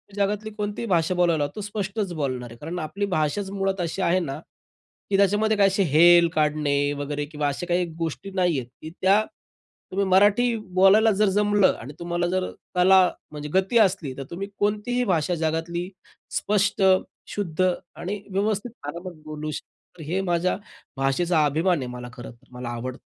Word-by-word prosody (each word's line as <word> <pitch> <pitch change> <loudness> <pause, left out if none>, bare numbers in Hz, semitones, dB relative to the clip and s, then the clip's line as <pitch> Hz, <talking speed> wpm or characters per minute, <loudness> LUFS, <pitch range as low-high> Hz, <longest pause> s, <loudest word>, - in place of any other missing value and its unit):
जगातली 205 +2 -1
कोणतीही 210 +2 -3
भाषा 175 -1 +1
बोलायला, 165 -5 +2
तो 210 - -5
स्पष्टच 200 -2 -3
बोलणार 130 -5 -3
आहे. 115 - -12
कारण 165 +6 -5
आपली 180 +6 -3
भाषाच 175 +6 -1
मुळात 195 -1 -1
अशी 170 +3 -3
आहे 185 +1 +3
ना, 145 -6 -4 0.7
की 195 - +2
त्याच्यामध्ये 205 +2 +3
काही 200 -1 +5
असे 195 +1 +1
हेल 170 +1 +7
काढणे 150 -2 +1 0.2
वगैरे 145 +1 -3
किंवा 150 -1 -2
अशा 145 +5 -3
काही 175 0 +1
गोष्टी 165 +4 -4
नाहीयेत 170 -9 +1 0.2
की 155 - -7
त्या 200 +3 +4 0.7
तुम्ही 195 +1 0
मराठी 205 +5 +4 0.2
बोलायला 205 +4 +6
जर 210 -2 +4
जमलं 205 0 +3
आणि 135 +5 -8
तुम्हाला 175 0 -1
जर 185 +1 -1 0.3
कला 190 +2 +6 0.3
म्हणजे 150 0 -6
गती 190 +5 +2
असली 185 -9 +2
तर 135 - -4
तुम्ही 195 +3 -4
कोणतीही 215 +4 0
भाषा 175 -2 +1
जगातली 165 +3 -2 0.5
स्पष्ट, 200 -1 +1 0.5
शुद्ध 185 -2 0 0.3
आणि 195 +4 -5
व्यवस्थित 210 +4 -1 0.2
आरामात 175 +4 -6
बोलू 155 0 -5
शकतो. 160 +2 -11
हे 180 +6 -1
माझ्या 175 0 0 0.4
भाषेचा 155 +4 +2
अभिमान 165 +5 +2
आहे, 125 - -4
मला 125 0 -7
खरंतर, 120 +1 -11
मला 125 -1 -6
आवडतं. 120 +2 -5
180 Hz, 160 wpm, -24 LUFS, 155-200 Hz, 0.7 s, हेल